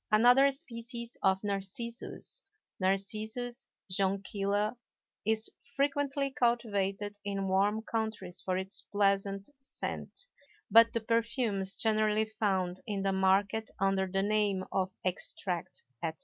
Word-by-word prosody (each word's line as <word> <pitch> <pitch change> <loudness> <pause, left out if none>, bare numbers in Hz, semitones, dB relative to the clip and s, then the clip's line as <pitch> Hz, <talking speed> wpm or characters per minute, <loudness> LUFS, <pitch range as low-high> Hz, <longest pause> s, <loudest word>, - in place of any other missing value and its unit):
Another 245 +6 +7
species 235 -4 -5
of 190 +1 +2
Narcissus 205 - -2 0.4
(Narcissus 215 +6 -1 0.2
Jonquilla) 200 +2 0 0.5
is 220 0 +2 0.3
frequently 280 0 +1
cultivated 205 -5 0
in 195 -1 -2
warm 200 +3 +2
countries 220 -6 -3
for 185 -1 -1
its 190 +1 -1
pleasant 195 -1 +1
scent; 270 - -5 0.5
but 230 0 +8
the 230 - 0
perfumes 230 -3 0
generally 215 -1 +2
found 190 -4 -1
in 200 -2 -2
the 195 0 +1
market 195 +3 +2
under 195 0 +2
the 195 +1 0
name 205 -2 +1
of 190 -1 0
Extract, 180 -1 -1 0.2
etc. 160 -1 -2
205 Hz, 110 wpm, -31 LUFS, 195-230 Hz, 0.5 s, but